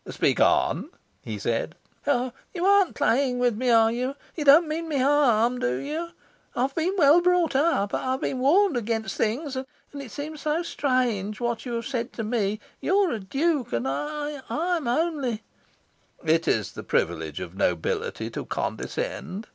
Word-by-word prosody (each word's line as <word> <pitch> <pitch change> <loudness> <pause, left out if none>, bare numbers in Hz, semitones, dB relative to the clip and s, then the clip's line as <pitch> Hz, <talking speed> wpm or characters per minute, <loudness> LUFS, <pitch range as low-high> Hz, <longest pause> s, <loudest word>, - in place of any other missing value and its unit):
"Speak - - +1
on," - - +2 0.3
he 110 -2 -5
said. 115 - -2 0.3
"Oh 255 -3 +1 0.2
you 350 +1 -1
aren't 400 -2 +4
playing 265 -2 +2
with 245 -2 +2
me, 250 +3 0
are 225 -1 +5
you? 250 +3 -2 0.2
You 310 - -2
don't 295 +4 +7
mean 325 +2 -3
me 295 - 0
harm, 250 -4 +3
do 125 +1 0
you? 310 - -4 0.5
I 245 - +1
have 270 +1 -1
been 340 +5 0
well 310 +1 +6
brought 355 -4 +2
up. 270 -9 +2
I 260 - 0
have 265 - -3
been 260 - -2
warned 340 +6 +4
against 225 -1 -2
things. 260 +6 -1
And 280 +2 -8
it 270 - -9
seems 295 +5 -6
so 310 +4 0
strange, 250 - 0
what 240 0 -2
you 240 - -3
have 230 0 -3
said 245 -2 -3
to 225 - -4
me. 215 -2 -1 0.2
You 380 - 0
are 395 -4 +3
a 230 - -2
Duke, 270 - -1
and 120 +2 -1
I 295 - -3
I 350 +2 0
am 305 - -5
only 265 -4 0 0.4
" - - -33
"It 165 - -2
is - - +1
the - - -8
privilege 80 -3 -1
of 90 -1 -7
nobility 90 -4 -1
to - - -4
condescend." 200 +5 -4
260 Hz, 185 wpm, -25 LUFS, 225-305 Hz, 0.5 s, don't